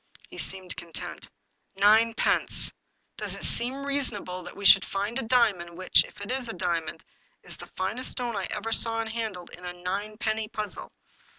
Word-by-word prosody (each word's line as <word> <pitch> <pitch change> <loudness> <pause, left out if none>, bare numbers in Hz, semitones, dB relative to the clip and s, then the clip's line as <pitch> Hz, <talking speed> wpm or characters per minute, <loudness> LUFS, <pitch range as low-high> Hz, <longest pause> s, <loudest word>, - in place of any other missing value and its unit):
He - - -10
seemed 185 -2 -3
content." 165 -2 -8 0.3
" - - -46
Ninepence! 220 +3 +3 0.4
Does - - 0
it - - -6
seem 265 +4 +4
reasonable 230 -10 0
that 180 - -10
we 200 - -7
should 195 0 +8
find 205 +6 -2
a 230 - -4
diamond, 200 -9 +2
which, 185 0 +4
if - - -15
it 205 - -5
is 255 -2 -2
a - - -4
diamond, 170 -3 -3 0.4
is - - -7
the - - -11
finest 215 +7 -1
stone 240 -3 -3
I 195 -2 -2
ever 215 +2 -4
saw 225 0 +3
and 225 -1 -3
handled, 215 -6 -5
in 180 - -13
a 180 0 -5
ninepenny 210 +4 -3
puzzle? 210 -2 -5
210 Hz, 180 wpm, -27 LUFS, 185-230 Hz, 0.4 s, should